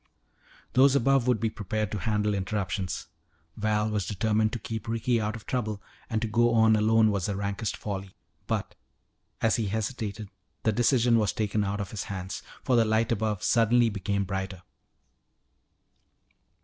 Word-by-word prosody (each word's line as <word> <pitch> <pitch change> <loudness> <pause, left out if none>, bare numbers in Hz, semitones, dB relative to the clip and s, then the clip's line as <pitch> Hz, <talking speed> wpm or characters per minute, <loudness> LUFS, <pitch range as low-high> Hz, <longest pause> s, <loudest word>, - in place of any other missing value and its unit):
Those 135 +2 +5
above 135 -1 +3
would 125 -3 +3
be 110 +1 0
prepared 110 -1 -3
to 105 - -2
handle 105 +1 0
interruptions. 95 -1 -2 0.5
Val 105 0 +1
was 105 -4 -1
determined 110 +2 +1
to - - -1
keep 110 -1 -6
Ricky 115 +1 +1
out 105 0 -2
of 115 - -10
trouble, 110 -5 -2 0.3
and 110 -3 0
to - - 0
go 120 +2 +3
on 110 -1 +5
alone 110 0 +4
was 100 -4 -1
the 100 - -2
rankest 100 +2 -2
folly. 95 -2 -5 0.3
But, - - -2 0.7
as 115 - +3
he 110 -3 -1
hesitated, 110 -1 -3 0.3
the 110 - +3
decision 120 0 +3
was 105 -4 +1
taken 105 -1 0
out 100 +1 -2
of 100 - -4
his 105 - -4
hands, 95 -1 -5 0.2
for 125 - +2
the 115 - +5
light 110 +1 +1
above 110 -3 -1
suddenly 120 0 +4
became 100 0 -1
brighter. 95 -1 -4
110 Hz, 160 wpm, -28 LUFS, 100-115 Hz, 0.7 s, Those